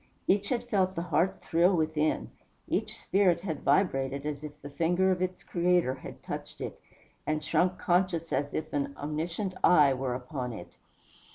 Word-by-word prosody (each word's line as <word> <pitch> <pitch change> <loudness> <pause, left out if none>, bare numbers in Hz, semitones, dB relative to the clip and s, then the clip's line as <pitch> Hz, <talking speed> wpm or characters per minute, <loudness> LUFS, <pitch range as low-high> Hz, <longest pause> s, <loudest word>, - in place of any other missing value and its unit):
Each 200 +1 +2
had 245 -2 0
felt 190 -4 +1
the 170 - -2
heart 175 +3 0
thrill 175 +3 +3
within 155 -1 0 0.4
each - - -1
spirit 185 -4 +2
had 160 -6 -4
vibrated 140 -3 +1
as 150 -1 -4
if 150 0 -8
the 145 - -9
finger 175 +4 +2
of 180 -1 0
its 185 0 -2
Creator 175 -6 +2
had 130 - -10
touched - - -6
it, - - -6 0.5
and 155 0 0
shrunk 180 +4 +1
conscious 175 -3 +1
as 140 +2 0
if 155 0 -3
an 140 -1 -1
omniscient 165 +6 -3
eye 150 -6 +6
were 130 -1 -2
upon 125 -1 -4
it. 90 -5 -9
165 Hz, 170 wpm, -29 LUFS, 145-185 Hz, 0.5 s, eye